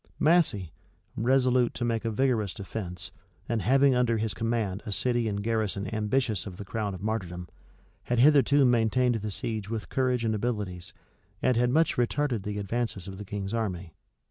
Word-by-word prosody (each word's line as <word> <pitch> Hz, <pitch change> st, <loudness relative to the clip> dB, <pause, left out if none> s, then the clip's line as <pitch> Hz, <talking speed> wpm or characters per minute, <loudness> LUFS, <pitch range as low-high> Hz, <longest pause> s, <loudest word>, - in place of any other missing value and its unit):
Massey, 150 Hz, -, +2 dB, 0.4 s
resolute 125 Hz, 0 st, +2 dB
to 120 Hz, -, -2 dB
make 115 Hz, -1 st, -1 dB
a -, -, +1 dB
vigorous 110 Hz, -4 st, 0 dB
defence, 95 Hz, -3 st, -5 dB, 0.4 s
and 115 Hz, -2 st, 0 dB
having 135 Hz, +6 st, +4 dB
under 125 Hz, -2 st, +2 dB
his 110 Hz, -1 st, -1 dB
command 110 Hz, -4 st, -1 dB
a 105 Hz, -, -6 dB
city 120 Hz, +2 st, +1 dB
and 100 Hz, -1 st, -2 dB
garrison 105 Hz, -3 st, -1 dB
ambitious 110 Hz, -2 st, 0 dB
of 90 Hz, -3 st, -8 dB
the 100 Hz, -, -7 dB
crown 105 Hz, -1 st, -3 dB
of 95 Hz, -, -9 dB
martyrdom, 90 Hz, -5 st, -3 dB, 0.6 s
had 120 Hz, -, 0 dB
hitherto 140 Hz, +1 st, +5 dB
maintained 120 Hz, +1 st, +3 dB
the 110 Hz, -2 st, -3 dB
siege 105 Hz, 0 st, -4 dB
with 110 Hz, -2 st, -4 dB
courage 125 Hz, -3 st, 0 dB
and 110 Hz, -, +1 dB
abilities, 105 Hz, -5 st, -3 dB, 0.5 s
and 125 Hz, -, +3 dB
had 120 Hz, +1 st, +2 dB
much 160 Hz, +6 st, +2 dB
retarded 125 Hz, -1 st, 0 dB
the 105 Hz, +1 st, -4 dB
advances 105 Hz, -2 st, -2 dB
of 95 Hz, 0 st, -8 dB
the 105 Hz, -, -6 dB
king's 100 Hz, +1 st, -4 dB
army. 95 Hz, -7 st, -3 dB
110 Hz, 170 wpm, -28 LUFS, 100-125 Hz, 0.6 s, hitherto